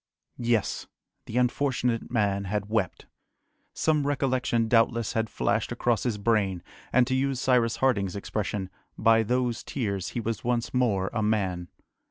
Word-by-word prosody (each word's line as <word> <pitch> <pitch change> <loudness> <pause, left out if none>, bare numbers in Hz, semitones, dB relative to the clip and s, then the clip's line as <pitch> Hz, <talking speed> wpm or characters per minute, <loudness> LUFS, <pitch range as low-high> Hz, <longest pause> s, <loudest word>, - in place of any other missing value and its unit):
Yes! 115 -3 0 0.4
the 115 - -3
unfortunate 125 -2 0
man 100 -4 0
had 105 +1 -2
wept! 110 -5 -1 0.7
Some 150 -3 +1
recollection 130 -5 +1
doubtless 115 -1 +2
had 110 -1 0
flashed 110 +3 0
across 120 -1 +1
his 120 -4 -1
brain, 100 -5 +1 0.3
and 130 - +5
to 130 - -2
use 135 0 0
Cyrus 125 -3 +2
Harding's 100 -8 +1
expression, 100 -1 -3 0.3
by 115 0 +5
those 120 +1 0
tears 100 -9 -3
he - - +1
was 115 0 -3
once 120 -1 -1
more 105 -7 +1
a 110 - 0
man. 95 -5 0
115 Hz, 145 wpm, -27 LUFS, 105-125 Hz, 0.7 s, and